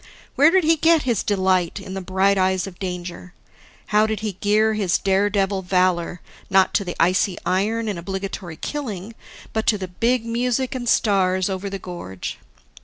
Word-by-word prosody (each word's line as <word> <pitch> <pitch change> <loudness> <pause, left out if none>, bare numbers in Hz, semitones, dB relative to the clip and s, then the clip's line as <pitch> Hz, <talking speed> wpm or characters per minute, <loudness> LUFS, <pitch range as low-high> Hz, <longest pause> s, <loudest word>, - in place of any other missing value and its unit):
Where 285 +3 +6
did 375 +1 +3
he 325 +1 +4
get 325 0 +4
his 235 -6 0
delight 185 -2 +1
in 190 -1 -8
the 190 - -4
bright 190 +2 +2
eyes 185 -1 +1
of 190 -2 -10
danger? 180 -1 -6 0.6
How 215 +1 +5
did 220 -1 -3
he 215 -1 -2
gear 215 +2 +3
his 200 -5 +1
daredevil 195 0 +1
valor, 180 -2 0 0.3
not 190 -1 +4
to 200 - +2
the 175 -2 -5
icy 180 +2 +2
iron 220 +5 0
and 200 -5 -3
obligatory 190 -2 -5
killing, 225 -8 -5 0.4
but 220 0 -2
to 210 - +4
the 190 -2 -5
big 230 +6 0
music 245 +2 -1
and 245 -2 -3
stars 190 -3 +2
over 190 +1 -3
the 195 - -4
gorge? 175 - -7
195 Hz, 175 wpm, -22 LUFS, 185-220 Hz, 0.6 s, Where